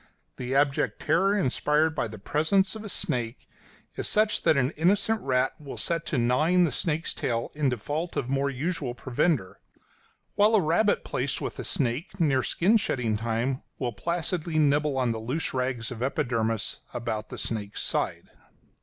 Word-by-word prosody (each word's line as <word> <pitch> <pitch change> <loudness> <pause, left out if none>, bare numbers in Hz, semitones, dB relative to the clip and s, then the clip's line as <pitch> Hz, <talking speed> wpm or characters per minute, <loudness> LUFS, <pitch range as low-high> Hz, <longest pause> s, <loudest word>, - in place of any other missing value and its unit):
The 130 +1 -3
abject 140 0 +2
terror 195 +4 +3
inspired 150 -1 +2
by 135 - -1
the 110 0 -9
presence 175 - +1
of 220 - -7
a 210 - -6
snake 125 - -3 0.5
is - - -2
such 215 0 +2
that 155 - +4
an 130 +1 +2
innocent 200 +7 +2
rat 130 0 +1
will 140 -2 -8
set 165 -1 -2
to 150 - 0
gnawing 150 +10 +3
the 165 - +2
snake's 160 +4 -1
tail 115 -1 -2
in 145 -2 +1
default 145 +8 -3
of 120 - -1
more 135 +1 +1
usual 140 -2 -2
provender; 125 - 0 0.7
while 210 +2 +4
a - - +6
rabbit 185 +5 +2
placed 135 +2 -1
with - - -5
a - - -3
snake 145 - -1
near 140 -6 +3
skin 195 - +3
shedding 125 - 0
time 115 +4 -1 0.2
will 120 -3 -2
placidly 170 - -2
nibble 150 -1 +3
the 115 -2 0
loose 130 +9 -2
rags 125 -3 -2
of 120 -2 -7
epidermis 115 -4 -1 0.2
about 115 -3 -3
the - - -7
snake's 105 -3 -2
sides. - - -1
140 Hz, 165 wpm, -27 LUFS, 120-170 Hz, 0.7 s, a